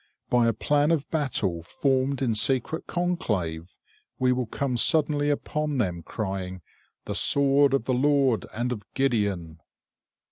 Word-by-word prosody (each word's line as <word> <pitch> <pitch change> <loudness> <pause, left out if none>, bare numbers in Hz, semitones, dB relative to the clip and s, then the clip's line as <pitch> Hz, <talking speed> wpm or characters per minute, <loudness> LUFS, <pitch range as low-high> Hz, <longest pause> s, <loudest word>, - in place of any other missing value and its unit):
By 120 -1 +3
a 115 - +1
plan 145 +7 0
of 160 -4 0
battle 115 - 0
formed 135 - -1
in 120 -3 0
secret 130 +8 +3
conclave, 95 - -3 0.5
we 130 0 +1
will 125 -2 -1
come 130 +2 -3
suddenly 145 +2 +3
upon 150 0 -2
them, 90 -8 -2
crying: 95 -2 -6 0.4
"The - - -4
sword 140 0 +4
of 135 - -1
the 130 - -1
Lord 135 -2 +1
and 120 +2 -3
of 115 -4 -4
Gideon!" 100 - -1
130 Hz, 140 wpm, -25 LUFS, 105-145 Hz, 0.5 s, sword